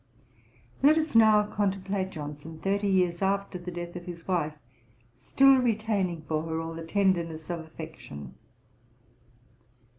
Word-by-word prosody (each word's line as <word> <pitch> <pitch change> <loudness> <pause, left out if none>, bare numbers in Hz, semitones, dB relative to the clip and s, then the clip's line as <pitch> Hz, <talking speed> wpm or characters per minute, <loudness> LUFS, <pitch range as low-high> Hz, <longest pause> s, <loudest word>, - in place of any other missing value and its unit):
Let 300 +3 +6
us 315 0 0
now 220 -2 +6
contemplate 195 -2 -1
Johnson 150 -1 -8
thirty 200 +3 0
years 180 -2 +2
after 195 -1 0
the 175 +1 -7
death 175 0 -6
of 175 -1 -7
his 170 -2 -9
wife, 165 -5 0 0.6
still 270 - +5
retaining 215 -8 0
for 155 0 -1
her 160 0 -3
all 165 0 -4
the 165 0 -7
tenderness 170 -3 0
of 170 - -3
affection. 160 - -9
180 Hz, 130 wpm, -28 LUFS, 165-200 Hz, 0.6 s, Let